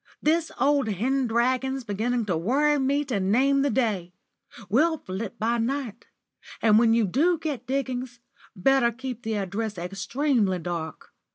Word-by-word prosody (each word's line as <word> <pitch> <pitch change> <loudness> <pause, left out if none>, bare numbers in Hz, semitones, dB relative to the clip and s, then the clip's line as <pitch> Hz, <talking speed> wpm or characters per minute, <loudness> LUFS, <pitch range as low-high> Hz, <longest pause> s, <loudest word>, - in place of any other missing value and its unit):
"This 325 +1 +1
old 280 -3 +2
hen 250 +6 0
dragon's 255 +3 0
beginning 225 +3 -1
to 185 -4 0
worry 280 - +2
me 280 +2 +1
to 245 -7 -1
name 260 +9 +2
the 285 - +2
day. 200 -10 -1 0.5
We'll 315 +9 +2
flit 195 -3 -6
by 230 +2 0
night. 240 -2 -3 0.5
And 215 -1 +5
when 230 -1 +4
you 230 -2 +3
do 315 - +2
get 300 -5 -5
diggings, 255 -2 -3 0.4
better 240 +5 +3
keep 250 0 -6
the 220 -2 -3
address 205 +1 -3
extremely 200 - 0
dark. 170 -2 -6
240 Hz, 150 wpm, -25 LUFS, 205-270 Hz, 0.5 s, And